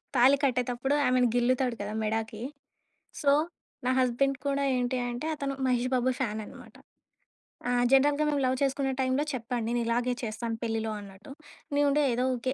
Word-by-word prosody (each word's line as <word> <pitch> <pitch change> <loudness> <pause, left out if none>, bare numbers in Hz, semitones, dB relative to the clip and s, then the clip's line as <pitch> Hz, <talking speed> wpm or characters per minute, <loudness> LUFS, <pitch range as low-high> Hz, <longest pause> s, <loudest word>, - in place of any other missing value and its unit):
తాళి 255 +3 +6
కట్టేటప్పుడు 250 +1 0
ఆమెని 250 0 +3
గిల్లుతాడు 250 0 +2
కదా! 205 +1 -4
మెడాకి. 220 0 -2 0.8
సో, 280 -1 +4 0.5
నా 255 - +3
హస్బెండ్ 260 +2 +2
కూడా 280 0 +1
ఏంటి 250 +1 0
అంటే 240 +6 -4
అతను 275 -2 -3
'మహేష్ 250 0 +1
బాబు' 255 +1 +2
ఫాన్ 220 -5 -1
అన్నమాట. - - -13 0.9
ఆ! - - +1 0.2
జనరల్‌గా 285 +2 +4
మేము 285 -1 0
లవ్ 255 0 +1
చేసుకునే 270 0 0
టైమ్‌లో 260 +3 +1
చెప్పాడు. 240 -1 -3
నేను 240 0 0
ఇలాగే 240 +2 +1
చేస్తాను 225 +1 -3
పెళ్లిలో 225 -1 -1
అన్నట్టు. 200 +5 -12 0.4
నేనుండి 290 +1 +3
ఏదో 250 +2 0
ఊకె 255 +2 -2
250 Hz, 155 wpm, -28 LUFS, 235-270 Hz, 0.9 s, తాళి